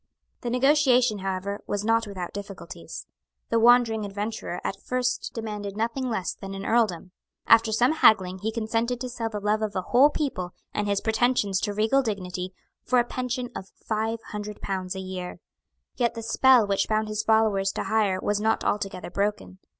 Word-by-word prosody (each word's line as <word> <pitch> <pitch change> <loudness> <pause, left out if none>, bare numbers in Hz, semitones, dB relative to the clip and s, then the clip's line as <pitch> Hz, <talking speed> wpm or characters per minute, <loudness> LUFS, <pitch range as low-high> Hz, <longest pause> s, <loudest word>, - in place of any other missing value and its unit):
The 240 - -3
negotiation 255 -3 +3
however 195 +1 -3
was 205 0 -2
not 225 0 +2
without 185 -3 -6
difficulties. 200 -1 -8 0.4
The 230 - +2
wandering 235 -2 +5
adventurer 205 -2 -4
at 195 - -4
first 250 -1 -1
demanded 210 -3 -5
nothing 235 +4 -1
less 190 -6 -2
than 195 -1 -8
an 195 - -6
earldom. 205 -6 +1 0.3
After 225 0 +5
some 240 +5 +3
haggling 190 -11 +4
he 215 +3 -2
consented 230 +2 -1
to 255 0 -4
sell 235 -2 -3
the 210 -2 -4
love 210 +1 0
of 215 -2 -2
a 185 - -1
whole 260 +8 +5
people, 260 - -3 0.2
and 210 - -1
his 200 -1 0
pretensions 220 -4 +1
to 205 - -1
regal 225 +6 +3
dignity, 185 -5 -4 0.3
for 255 - +2
a 240 - +5
pension 250 0 -3
of 190 - -7 0.2
five 220 +1 -1
hundred 210 -1 -6
pounds 185 -1 -3
a - - -4
year. 185 -1 -6 0.6
Yet 240 -1 +1
the 230 - -5
spell 250 0 +5
which 200 -1 0
bound 215 0 0
his 215 0 -2
followers 215 -3 +2
to - - -3
hire 210 -4 +1
was 205 +1 -1
not 220 +1 +1
altogether 195 -3 -2
broken. 200 -1 -2
215 Hz, 180 wpm, -26 LUFS, 195-235 Hz, 0.6 s, wandering